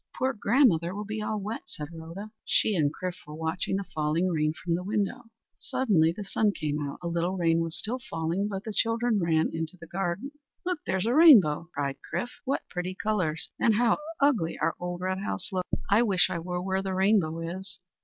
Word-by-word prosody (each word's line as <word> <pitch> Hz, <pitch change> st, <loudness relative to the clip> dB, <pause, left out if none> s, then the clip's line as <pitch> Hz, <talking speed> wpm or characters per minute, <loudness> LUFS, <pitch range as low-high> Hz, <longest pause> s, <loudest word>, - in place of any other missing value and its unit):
"Poor 260 Hz, +1 st, +1 dB
grandmother 200 Hz, -, +3 dB
will 210 Hz, +1 st, -4 dB
be 215 Hz, +1 st, -4 dB
all 210 Hz, 0 st, -2 dB
wet!" 210 Hz, +3 st, -4 dB
said 150 Hz, -1 st, -6 dB
Rhoda. 165 Hz, +6 st, -8 dB
She 215 Hz, -, +2 dB
and 150 Hz, -4 st, +2 dB
Chrif 180 Hz, +2 st, -5 dB
were 150 Hz, -, -8 dB
watching 160 Hz, +4 st, -1 dB
the 200 Hz, -, -1 dB
falling 160 Hz, +1 st, 0 dB
rain 155 Hz, -2 st, +1 dB
from 170 Hz, +2 st, -3 dB
the 175 Hz, -, 0 dB
window. 210 Hz, +4 st, -1 dB, 0.3 s
Suddenly 225 Hz, -, +2 dB
the 205 Hz, +5 st, -6 dB
sun 205 Hz, +1 st, +1 dB
came 150 Hz, -3 st, -2 dB
out. 140 Hz, -1 st, -4 dB
A -, -, -2 dB
little 170 Hz, +2 st, -1 dB
rain 165 Hz, -2 st, +3 dB
was 165 Hz, 0 st, -2 dB
still 245 Hz, +5 st, -1 dB
falling, 165 Hz, +5 st, -1 dB
but 195 Hz, -1 st, -4 dB
the 220 Hz, -, -5 dB
children 230 Hz, 0 st, +1 dB
ran 160 Hz, -3 st, +2 dB
into 165 Hz, +2 st, -4 dB
the 170 Hz, -, -10 dB
yard. 190 Hz, +2 st, -1 dB, 0.4 s
"Look, 360 Hz, -2 st, -1 dB
there's 190 Hz, +1 st, 0 dB
a 235 Hz, -, +2 dB
rainbow!" 210 Hz, -, +7 dB
cried 140 Hz, -1 st, -2 dB
Chrif. 190 Hz, +9 st, -3 dB
"What 275 Hz, +1 st, -1 dB
pretty 180 Hz, +1 st, -4 dB
colours! 185 Hz, -7 st, -1 dB
and 225 Hz, -, +4 dB
how 235 Hz, +3 st, +3 dB, 0.2 s
ugly 250 Hz, -, +2 dB
our 165 Hz, -, +1 dB
old 175 Hz, 0 st, -4 dB
red 185 Hz, +1 st, -1 dB
house 195 Hz, -1 st, -2 dB
looks! 185 Hz, -1 st, -2 dB, 0.2 s
I 210 Hz, +3 st, +6 dB
wish 195 Hz, -6 st, +3 dB
I 170 Hz, -, -2 dB
were 180 Hz, +1 st, -3 dB
where 190 Hz, 0 st, 0 dB
the 190 Hz, -1 st, -3 dB
rainbow 190 Hz, -4 st, +2 dB, 0.2 s
is." 190 Hz, -1 st, -9 dB
185 Hz, 205 wpm, -28 LUFS, 165-215 Hz, 0.4 s, rainbow